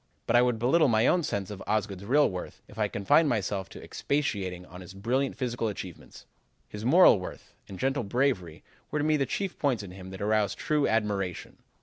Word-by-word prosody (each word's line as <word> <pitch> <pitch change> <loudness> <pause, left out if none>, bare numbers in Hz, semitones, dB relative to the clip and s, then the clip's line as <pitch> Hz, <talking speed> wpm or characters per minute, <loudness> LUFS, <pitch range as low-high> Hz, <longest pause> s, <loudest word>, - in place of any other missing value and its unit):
"But - - +1
I 120 - +7
would 125 -2 +2
belittle 140 +8 +3
my 110 -1 +3
own 180 - +4
sense 100 - -3
of 100 - -8
Osgood's 100 -2 -1
real 145 +6 +4
worth 90 -1 -7
if 110 - -13
I 105 - +2
confined 105 +11 +3
myself 100 -4 -2
to - - -11
expatiating 95 -11 -2
on 90 +1 -11
his 90 +1 -11
brilliant 125 +7 -1
physical 120 -3 -2
achievements. 95 -4 -8 0.4
His 105 0 -8
moral 140 - +6
worth 90 - -9
and 95 - -9
gentle 135 +4 0
bravery 100 - -1 0.3
were - - -2
to 150 - 0
me 155 0 +3
the 140 -3 0
chief 195 -2 -3
points 130 -8 0
in 95 - -9
him 95 0 -10
that 95 0 -9
arouse 105 -1 +1
true 150 -2 0
admiration. 100 -5 -2
110 Hz, 205 wpm, -28 LUFS, 95-135 Hz, 0.4 s, I